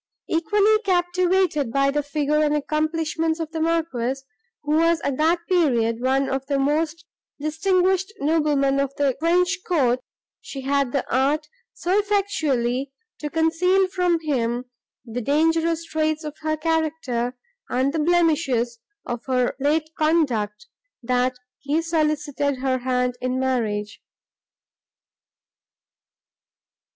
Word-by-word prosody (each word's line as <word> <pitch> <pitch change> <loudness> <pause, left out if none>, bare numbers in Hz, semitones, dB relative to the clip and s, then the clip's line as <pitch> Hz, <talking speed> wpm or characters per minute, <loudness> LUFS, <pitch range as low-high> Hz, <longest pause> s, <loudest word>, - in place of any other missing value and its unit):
Equally 415 +6 +3
captivated 360 - +1
by 275 +2 +2
the 295 +1 0
figure 295 +1 0
and 300 0 +2
accomplishments 315 +2 -1
of 320 -1 -4
the 325 - -4
Marquis, 310 -6 0 0.4
who 295 - -3
was 330 0 +3
at 275 -2 -2
that 335 +2 +2
period 240 -10 +2
one 265 +2 +2
of 270 0 -2
the 280 -1 0
most 310 +4 0 0.3
distinguished 370 +5 +1
noblemen 285 -2 +2
of 275 0 -1
the 280 -3 +1
French 355 +3 +2
court, 255 -8 +2 0.4
she 270 - -7
had 275 -1 0
the 275 -1 -1
art 290 +4 +1 0.3
so 370 +4 +1
effectually 305 -12 0 0.3
to 300 - -4
conceal 340 +4 +2
from 360 -2 +1
him 245 -5 -1 0.4
the 240 +1 -4
dangerous 325 +4 +1
traits 310 0 -1
of 300 -1 -6
her 310 0 -1
character 305 -7 -1 0.3
and 265 +3 +1
the 325 - -1
blemishes 300 -8 +1 0.3
of 240 0 -4
her 250 -2 +1
late 305 +3 +1
conduct, 285 - +1 0.4
that 250 +1 +1 0.2
he 290 +3 0
solicited 300 -4 0
her 260 0 0
hand 250 0 0
in 255 0 -1
marriage. 215 -6 -1
300 Hz, 120 wpm, -23 LUFS, 260-330 Hz, 0.4 s, Equally